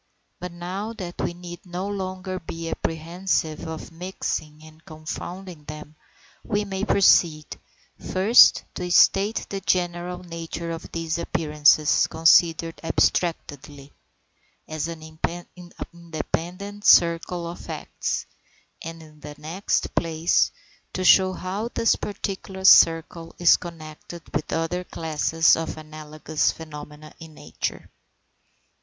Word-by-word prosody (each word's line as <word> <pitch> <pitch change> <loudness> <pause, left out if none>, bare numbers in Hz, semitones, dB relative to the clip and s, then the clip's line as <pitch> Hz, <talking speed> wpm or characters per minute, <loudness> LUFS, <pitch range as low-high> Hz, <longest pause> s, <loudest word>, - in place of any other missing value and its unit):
But 180 0 -6
now 185 +6 -5
that 180 -5 -6
we 170 - -2
need 175 -1 -10
no 180 +2 -5
longer 185 -1 -4
be 165 0 -7
apprehensive 165 -1 -2
of 160 +1 -7
mixing 165 -3 -4
or 155 - -13
confounding 165 +1 -8
them, 150 0 -9 0.5
we 205 -1 -1
may 195 -1 -4
proceed, 170 -7 +4 0.6
first, 205 +6 +6
to 180 0 -4
state 200 +4 +4
the 195 -1 -4
general 180 -1 -1
nature 165 -1 -6
of 165 -1 -7
these 165 0 -2
appearances 150 -2 +3
considered 165 0 +3
abstractedly, 145 -4 -1 0.7
as 155 +1 -3
an 165 -2 -7 0.9
independent 175 +4 -5
circle 170 0 +4
of 170 - -7
facts, - - -4 0.6
and, 165 0 -8
in 155 -1 -17
the 150 0 -9
next 165 +6 -2
place, 165 0 +2 0.4
to 185 - -2
show 185 0 +6
how 190 +5 -4
this 230 - +3
particular 190 -2 -5
circle 165 -2 +5
is 175 -1 +6
connected 165 0 -9
with 150 - -2
other 165 +2 -1
classes 160 -1 +2
of 165 -1 -4
analogous 155 0 -2
phenomena 150 -1 -10
in 160 -2 -12
nature. 80 - -5
170 Hz, 115 wpm, -24 LUFS, 155-185 Hz, 0.9 s, first